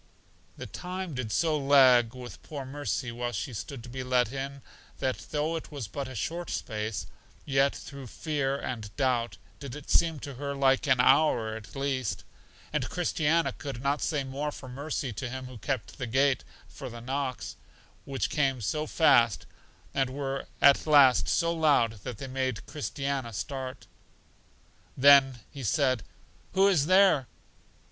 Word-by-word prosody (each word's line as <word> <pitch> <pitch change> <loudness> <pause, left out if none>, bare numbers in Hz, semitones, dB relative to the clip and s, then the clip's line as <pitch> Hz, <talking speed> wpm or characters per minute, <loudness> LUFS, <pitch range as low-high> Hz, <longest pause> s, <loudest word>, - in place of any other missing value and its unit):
The - - -6
time 185 -1 -5
did 125 -4 -4
so 155 - +2
lag 130 -4 +5
with 125 -1 -9
poor 145 -3 -7
Mercy 135 -2 -3
while 120 +1 -3
she 110 +4 -4
stood 115 +4 -6
to 120 - -10
be 130 +2 -5
let 125 -2 +2
in, 140 0 -5 0.3
that 130 -1 -3
though 155 +2 -1
it 160 - -6
was 140 -7 -5
but 135 +7 -5
a 130 - -8
short 170 - -3
space, 110 -2 -3 0.4
yet 140 -1 +2
through 140 -2 -9
fear 140 0 -2
and 110 -5 -5
doubt 125 -4 0 0.2
did 140 -3 -7
it 150 -1 -8
seem 165 -3 +3
to 140 - -6
her 140 +2 -4
like 135 0 +3
an 130 -2 +4
hour 125 -4 +4
at 110 +3 -10
least; 135 -2 -2 0.5
and - - -1
Christiana 165 -2 +1
could 135 -4 -7
not 140 +1 +1
say 150 -3 0
more 140 +3 -3
for 130 - -10
Mercy 135 -1 -4
to 120 +5 -4
Him 130 +1 -6
who 125 -3 -10
kept 130 +3 -4
the 125 - -3
gate 135 +3 +2 0.2
for - - -8
the 120 - -8
knocks, 130 +1 -3 0.5
which 135 -1 -2
came 135 -4 +1
so 150 +8 -2
fast, 115 - +4 0.5
and 135 -2 +1
were 135 0 -4 0.2
at 140 +2 +6
last 140 -4 +6
so 170 -1 +2
loud 140 -9 +2
that 120 - -5
they 135 - -6
made 130 -3 -2
Christiana 140 -5 -3
start. 130 +4 -5 1.1
Then 135 -2 +6
He 140 - -8
said, 130 +1 +1 0.5
Who 195 +1 +5
is 160 -7 +3
there? 185 -8 +5
135 Hz, 165 wpm, -28 LUFS, 125-145 Hz, 1.1 s, at